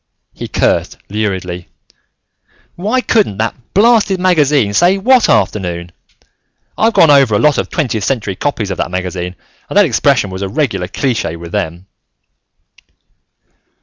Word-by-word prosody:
He - - -7
cursed - - 0
luridly. 95 -4 -3 1.1
"Why 215 +8 -1
couldn't 210 - +1
that 110 +1 -1 0.2
blasted 210 -2 +3
magazine 150 - +2
say 175 - +3
what 245 +4 +3
afternoon? 85 -4 0 0.8
I've 225 +1 +2
gone 160 - +6
over 135 -6 +4
a - - +4
lot 150 +5 +2
of - - -3
twentieth 120 - -2
century 110 -5 -2
copies 110 -5 -2
of 95 - -5
that - - -1
magazine 90 0 -4 0.3
and - - -2
that 205 - +6
expression 125 - +1
was 95 +1 -6
a 100 - -3
regular 115 - -1
cliche 115 - -2
with 85 0 -10
them." 90 -3 -3
115 Hz, 140 wpm, -14 LUFS, -, 1.1 s, gone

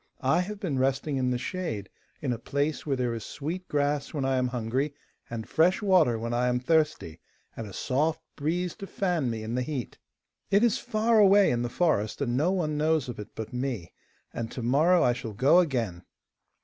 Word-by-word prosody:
I 135 +6 +4
have 205 +3 -5
been 160 -10 -2
resting 135 +2 0
in 130 -1 +1
the 125 - 0
shade 130 - -4 0.4
in 130 -4 0
a 115 - -5
place 145 +5 -2
where 140 - +1
there 125 -2 -1
is 115 -2 -5
sweet 170 +6 -5
grass 145 0 -1
when 140 -3 -1
I 135 -1 +1
am 125 0 +1
hungry, 125 +4 -2 0.3
and 115 -1 -5
fresh 175 +4 +3
water 185 - +4
when 115 +1 -3
I 125 +1 +1
am 125 0 +1
thirsty, 150 - 0 0.4
and 115 - -6
a - - -9
soft 150 +9 0 0.2
breeze 170 +4 -1
to 195 - -7
fan 175 -11 0
me 110 -2 -4
in 110 +2 -4
the 125 - 0
heat. 130 -2 -4 0.5
It 200 +3 +4
is 235 -3 +3
far 220 +1 +2
away 200 -3 +6
in 120 -1 0
the 120 - -2
forest, 120 - 0
and 125 -4 -1
no 155 +8 +2
one 155 -6 -1
knows 155 -3 +1
of 120 - -6
it 105 - -9
but 110 +2 -6
me, 125 -8 -3 0.4
and 115 -1 -4
to 125 - -6
morrow 155 +9 +4
I 120 - +4
shall 120 -3 -6
go 135 - +5
again. 120 - -1
135 Hz, 210 wpm, -27 LUFS, 120-165 Hz, 0.5 s, away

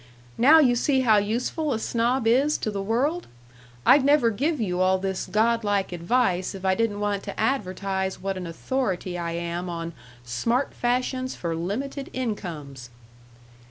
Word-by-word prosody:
Now 285 +7 +7
you 260 -6 +5
see 265 +2 +2
how 220 -4 +5
useful 245 +8 -1
a - - -1
snob 235 +2 0
is 270 +6 +3
to 215 - -3
the 200 -1 -3
world! 265 - 0 0.6
I'd 280 - +6
never 280 -4 +4
give 290 +8 -1
you 185 -5 -1
all 185 0 +3
this 190 0 -3
god 230 +2 +2
like 200 -2 0
advice 180 +1 0
if 190 0 -7
I 190 - +4
didn't 210 0 0
want 205 -1 -1
to 200 - -6
advertise 195 -5 -1
what 195 0 -3
an 180 -2 -5
authority 185 0 -2
I 170 -1 -3
am 170 +1 -3
on 170 0 -5 0.3
'Smart 230 - -1
Fashions 255 +1 -1
for 170 -2 -3
Limited 265 - -4
Incomes.'" 155 - -5
210 Hz, 160 wpm, -25 LUFS, 185-255 Hz, 0.6 s, Now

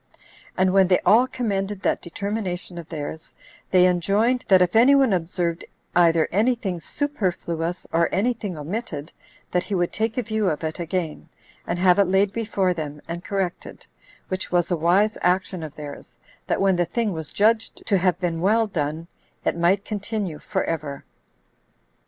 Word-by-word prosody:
And 185 0 +3
when 195 -1 +5
they 180 -1 +4
all 240 +4 +6
commended 205 -5 -2
that - - +1
determination 185 -1 -4
of 165 - -10
theirs, 160 0 -7 0.3
they 180 -1 +5
enjoined, 200 +8 +2
that 190 -3 +6
if 180 +1 +2
any 250 +5 +7
one 270 -6 +4
observed 170 -1 -1 0.3
either 165 -2 +4
any 225 +7 +3
thing 190 -7 -4
superfluous, 175 - -2
or 170 +1 +3
any 230 +6 +2
thing 205 -7 -6
omitted, 155 -1 -5 0.4
that 180 0 0
he 195 - -2
would 175 -1 0
take 225 +1 -1
a 250 - +1
view 220 -3 0
of 155 - -3
it 160 +2 -3
again, 170 -2 -3 0.4
and 170 - -1
have 180 +1 +4
it 200 - +6
laid 190 +2 +2
before 205 -5 0
them, 150 -3 -5
and 170 +1 -5
corrected; 195 -3 -4 0.4
which 185 0 -4
was 175 0 +1
a - - +3
wise 185 +7 +2
action 180 0 +1
of 155 -2 -7
theirs, 150 -1 -9 0.3
that - - 0
when 195 -2 +3
the 175 - +2
thing 215 +3 -1
was 160 -2 -6
judged 220 +2 +1
to 200 -3 +2
have 180 -1 +1
been 170 -2 -2
well 220 +5 +3
done, 160 -4 -3 0.4
it - - +1
might 180 +4 +2
continue 205 -6 -3
for - - -2
ever. 145 -4 -4
185 Hz, 175 wpm, -23 LUFS, 170-205 Hz, 0.4 s, any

